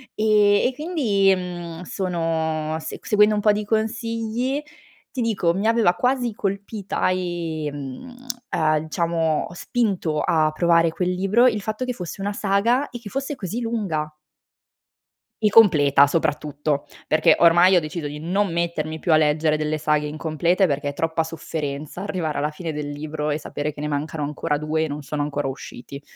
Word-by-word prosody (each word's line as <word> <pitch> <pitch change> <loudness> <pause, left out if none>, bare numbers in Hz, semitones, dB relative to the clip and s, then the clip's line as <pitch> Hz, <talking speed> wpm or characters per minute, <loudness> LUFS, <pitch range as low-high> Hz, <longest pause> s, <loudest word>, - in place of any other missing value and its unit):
E 210 -1 +4
e 260 - -2
quindi, 245 - +2
mhmm, 175 -2 -6
sono 160 -4 -2
se 155 - -7
seguendo 210 0 +4
un 210 - 0
po' 210 - +5
di 210 0 -2
consigli, 230 +4 -1 0.5
ti 255 - -3
dico, 195 -7 +1
mi 200 +3 0
aveva 225 -6 +4
quasi 245 +3 0
colpita, 200 0 -2
ehm 165 - -4 0.4
uhm, 155 -1 +2
diciamo 165 0 -1
spinto 185 -8 -1
a 160 -4 +2
provare 170 +1 +3
quel 180 +2 -1
libro 195 +7 +3
il 215 -4 +1
fatto 215 +4 -3
che 250 - -2
fosse 180 -3 -7
una 205 +1 -2
saga, 210 +7 +1
e 240 - -8
che 225 -3 -9
fosse 275 +5 -3
così 210 -1 -4
lunga 175 -10 -2 1.3
e 210 - +3
completa 145 -10 +6
soprattutto, 150 -2 -1 0.2
perché 155 0 +4
ormai 175 +2 +6
ho - - +5
deciso 155 -1 -5
di 145 +1 -7
non 185 +4 0
mettermi 165 -2 -2
più 170 - 0
a - - +7
leggere 155 0 +2
delle 155 0 -1
saghe 150 -1 +1
incomplete, 160 +5 +1
perché 145 -2 -2
troppa 165 +2 0
sofferenza 155 0 -5
arrivare 180 -7 -2
alla 150 +1 0
fine 160 +1 -5
del 150 -1 -4
libro, 150 +1 -4
e 150 - 0
sapere 150 0 -4
che 145 - -10
ne 150 - -2
mancano 150 +1 -3
ancora 150 0 -2
2 155 +1 -1
e - - -2
non 145 0 -5
sono 145 +1 -3
ancora 145 -1 -2
usciti. 135 +1 -8
170 Hz, 165 wpm, -23 LUFS, 155-205 Hz, 1.3 s, a